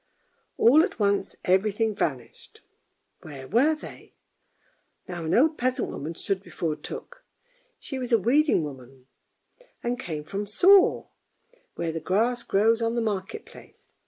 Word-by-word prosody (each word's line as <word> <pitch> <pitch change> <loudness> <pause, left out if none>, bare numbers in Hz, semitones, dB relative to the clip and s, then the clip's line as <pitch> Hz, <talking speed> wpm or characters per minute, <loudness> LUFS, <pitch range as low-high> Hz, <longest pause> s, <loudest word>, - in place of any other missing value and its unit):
All 275 +7 +6
at 380 - -2
once 200 -1 0
every 190 +3 +3
thing 220 +1 -1
vanished 130 - -5 0.3
— - - -48
where 140 -4 -10
were 270 - +3
they? 305 - -12 0.9
Now 175 -3 -6
an 160 - +1
old 310 +5 +3
peasant 255 +1 0
woman 160 +4 -6
stood 195 +2 -2
before 165 -5 -3
Tuk; - - -9 0.5
she 270 - -6
was 250 -1 -5
a 230 - +6
weeding 260 - +2
woman, 130 -2 -10 0.8
and 245 +1 -2
came 155 -10 -5
from 200 +6 -4
Soro, 370 - +4 0.7
where 165 - -2
the 165 - -4
grass 230 +9 0
grows 225 +2 +2
on 230 +1 0
the - - +1
market 210 - -3
place. - - -17
210 Hz, 150 wpm, -26 LUFS, 165-245 Hz, 0.9 s, All